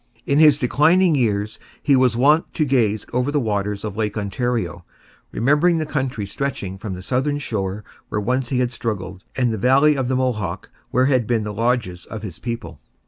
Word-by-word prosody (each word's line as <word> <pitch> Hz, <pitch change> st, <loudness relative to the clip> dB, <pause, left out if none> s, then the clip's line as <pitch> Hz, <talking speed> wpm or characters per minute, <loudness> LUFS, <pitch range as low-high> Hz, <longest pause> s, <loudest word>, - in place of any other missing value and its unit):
In 140 Hz, +1 st, +2 dB
his 150 Hz, -2 st, +7 dB
declining 160 Hz, +8 st, +3 dB
years 110 Hz, -5 st, 0 dB, 0.2 s
he 140 Hz, -, +4 dB
was 130 Hz, -3 st, +3 dB
wont 150 Hz, +6 st, +3 dB
to 155 Hz, -, +1 dB
gaze 115 Hz, -6 st, +1 dB
over 125 Hz, +3 st, 0 dB
the 145 Hz, -, +1 dB
waters 105 Hz, -4 st, -2 dB
of 105 Hz, -2 st, -5 dB
Lake 110 Hz, -1 st, -2 dB
Ontario, 105 Hz, -5 st, -2 dB, 0.5 s
remembering 150 Hz, +7 st, +3 dB
the 155 Hz, -, -1 dB
country 130 Hz, -7 st, -2 dB
stretching 100 Hz, -4 st, -4 dB
from 100 Hz, -2 st, -5 dB
the 90 Hz, -, -9 dB
southern 135 Hz, +6 st, 0 dB
shore 105 Hz, -7 st, -3 dB, 0.3 s
where 105 Hz, -, -1 dB
once 125 Hz, +4 st, -1 dB
he 130 Hz, -, 0 dB
had 125 Hz, -1 st, -1 dB
struggled, 95 Hz, -6 st, -4 dB
and 125 Hz, -3 st, +1 dB
the 110 Hz, -, -3 dB
valley 140 Hz, +7 st, +4 dB
of 135 Hz, -2 st, -1 dB
the 130 Hz, -, 0 dB
Mohawk, 105 Hz, -6 st, -2 dB, 0.2 s
where 130 Hz, +1 st, +2 dB
had 130 Hz, -5 st, +2 dB
been 115 Hz, -3 st, +1 dB
the 105 Hz, 0 st, -4 dB
lodges 115 Hz, -5 st, -1 dB
of 110 Hz, -1 st, -7 dB
his 90 Hz, -6 st, -7 dB
people. 115 Hz, -, -6 dB
120 Hz, 195 wpm, -21 LUFS, 105-135 Hz, 0.5 s, his